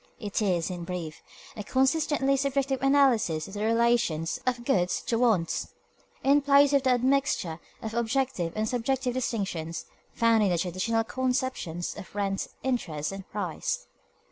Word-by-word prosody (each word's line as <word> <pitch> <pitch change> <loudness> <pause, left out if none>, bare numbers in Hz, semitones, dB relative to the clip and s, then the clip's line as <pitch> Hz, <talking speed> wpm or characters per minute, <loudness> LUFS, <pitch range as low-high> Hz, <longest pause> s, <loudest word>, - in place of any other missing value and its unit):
It 205 0 -2
is, 185 -4 +1
in 175 -1 -5
brief, 170 -3 -5 0.3
a 210 - -5
consistently 270 +3 +2
subjective 275 -1 0
analysis 260 - +3
of 195 - -11
the 210 0 -3
relations 230 -6 +1
of 245 -1 -1
goods 180 -9 +1
to 230 -3 0
wants, 195 -10 +1 0.6
in 280 +2 +5
place 280 0 +5
of 280 - +5
the 260 - +1
admixture 250 -9 +1 0.2
of 220 0 -4
objective 235 -6 0
and 215 0 0
subjective 250 +1 -1
distinctions 195 -10 -3 0.3
found 230 -1 +3
in 205 - +3
the 175 - +1
traditional 185 +6 0
conceptions 250 -9 -2
of 205 -1 -11
rent, 195 -1 -1 0.2
interest, 180 - -2
and 195 -1 -8
price. 185 -6 -3
230 Hz, 145 wpm, -27 LUFS, 185-265 Hz, 0.6 s, in